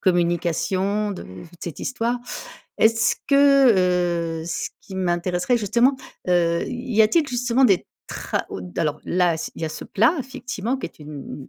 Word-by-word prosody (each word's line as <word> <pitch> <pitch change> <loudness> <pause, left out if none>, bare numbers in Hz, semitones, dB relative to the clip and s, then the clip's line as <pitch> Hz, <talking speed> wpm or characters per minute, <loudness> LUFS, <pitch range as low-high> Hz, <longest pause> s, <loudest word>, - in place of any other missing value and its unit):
communication, 185 +3 +1
de 195 - -6
toute 165 - -12
cette 170 - -6
histoire. 245 -1 -1 0.6
Est-ce 225 +1 +4
que, 180 - +4
heu, - - -8
ce 170 - -3
qui 190 - -11
m'intéresserait 180 +5 0
justement, 235 +6 +3 0.3
heu, 170 -1 +2
y 245 -3 +1
a-t-il 300 +8 +3
justement 245 +1 +2
des 195 -4 +2 0.2
tra - - -3
ou - - -5
d 90 -1 -8
alors 150 -2 0
là 175 -2 +1
s'il 165 - -6
y - - +1
a 155 - -3
ce - - -7
plat 230 - +2
effectivement 250 -2 -4
qui - - -7
est 165 - -16
une 150 0 -10
une 135 - -8
190 Hz, 165 wpm, -23 LUFS, 170-245 Hz, 0.6 s, Est-ce